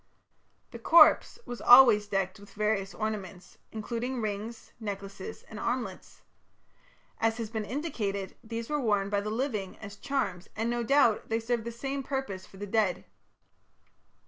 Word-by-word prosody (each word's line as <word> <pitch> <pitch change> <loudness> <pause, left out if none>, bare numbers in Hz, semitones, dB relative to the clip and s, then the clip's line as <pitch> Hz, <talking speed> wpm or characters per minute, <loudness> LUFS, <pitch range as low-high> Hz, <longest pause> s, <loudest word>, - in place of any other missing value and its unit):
The - - -8
corpse 340 - +6
was 245 - -7
always 240 -5 +8
decked 195 -2 -1
with 205 - -15
various 210 -2 -1
ornaments, 205 -4 -5
including 235 +3 -3
rings, 215 +1 -5
necklaces, 200 -3 -6
and 220 - -10
armlets. 245 +2 -4 1.0
As 225 0 +1
has 225 -2 -5
been 220 -2 -3
indicated, 210 - -3
these 230 +1 -5
were 295 -1 -1
worn 205 -4 +1
by 200 -1 +1
the 210 - -4
living 220 -5 -2
as 200 -2 -10
charms, 270 -8 -2
and, 225 +2 -1
no 240 0 -1
doubt, 235 -2 +3
they 225 0 +1
served 230 0 -2
the 235 - -3
same 270 +4 -4
purpose 265 -9 -4
for 195 - -16
the 205 - -5
dead. 205 -3 0
220 Hz, 150 wpm, -29 LUFS, 200-240 Hz, 1.0 s, always